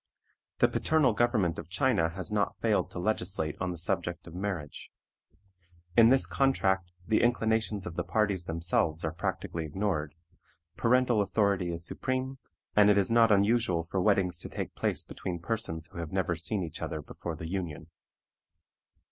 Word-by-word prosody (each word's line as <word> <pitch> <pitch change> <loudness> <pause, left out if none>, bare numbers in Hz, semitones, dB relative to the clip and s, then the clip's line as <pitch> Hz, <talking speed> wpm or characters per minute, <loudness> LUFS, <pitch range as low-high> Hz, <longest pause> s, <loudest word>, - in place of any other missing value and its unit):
The - - +5
paternal 150 -6 +2
government 105 -7 +1
of - - -9
China 100 - +2
has 95 +4 -5
not 105 -1 0
failed 110 -2 +1
to - - -9
legislate 90 -5 -1
on 95 - 0
the 90 - -4
subject 85 0 0
of 85 - -11
marriage. 90 -6 -5 1.1
In 115 -1 +7
this 135 +1 +4
contract 95 -10 +1 0.2
the 110 - +3
inclinations 110 -4 +1
of 85 -1 -7
the - - 0
parties 100 -5 0
themselves 85 -1 0
are 80 - -1
practically 85 0 -3
ignored; 80 -2 -2 0.6
parental 125 -2 +3
authority 100 -3 +1
is 85 0 -6
supreme, 130 +3 -2 0.4
and 105 0 +6
it 105 - +5
is 100 +2 +2
not 115 -1 +5
unusual 100 -4 +3
for 95 - +1
weddings 95 -4 +2
to - - -4
take - - -5
place - - -1
between 90 -2 -5
persons 85 -3 -3
who - - -8
have 85 -2 -5
never 95 -2 0
seen 90 +4 -2
each 80 - -7
other 80 -1 -4
before 85 +2 -6
the 80 +1 -7
union. 85 -3 -5
95 Hz, 165 wpm, -29 LUFS, 85-110 Hz, 1.1 s, In